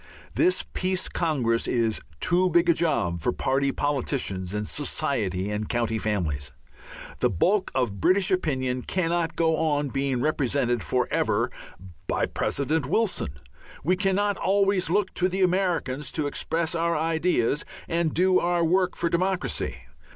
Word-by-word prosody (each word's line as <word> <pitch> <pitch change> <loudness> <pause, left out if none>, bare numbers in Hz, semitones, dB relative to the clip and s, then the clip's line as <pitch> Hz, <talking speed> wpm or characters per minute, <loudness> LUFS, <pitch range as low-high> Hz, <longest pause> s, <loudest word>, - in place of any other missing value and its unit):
This 365 +2 +2
Peace 185 0 0
Congress 130 -9 0
is 115 -3 0 0.2
too 180 +2 +2
big 170 0 +3
a - - +7
job 90 - 0
for 125 - +1
party 135 +2 0
politicians 130 -11 -2
and 105 0 -3
society 105 -9 -1
and 105 0 -3
county 115 -2 0
families. 85 -10 -2 0.7
The - - +3
bulk 185 - +1
of 105 -7 -1
British 185 - +3
opinion 130 -8 0
cannot 170 0 -1
go 160 -1 +2
on 145 -3 0
being 135 -1 -1
represented 125 -4 0
for 80 - 0
ever - - +1 0.6
by - - +1
President 145 0 -1
Wilson. 175 - 0 0.4
We 180 +6 +3
cannot 200 +1 +1
always 195 -2 +2
look 190 +2 +1
to 185 +1 +1
the 190 +1 0
Americans 175 -7 0
to 155 - -1
express 165 +3 -1
our 170 0 +1
ideas 160 -4 +1 0.2
and 170 -2 0
do 185 +3 +3
our 175 -1 +1
work 180 +2 +2
for 170 - -1
democracy. 185 +3 -1
160 Hz, 145 wpm, -26 LUFS, 125-180 Hz, 0.7 s, a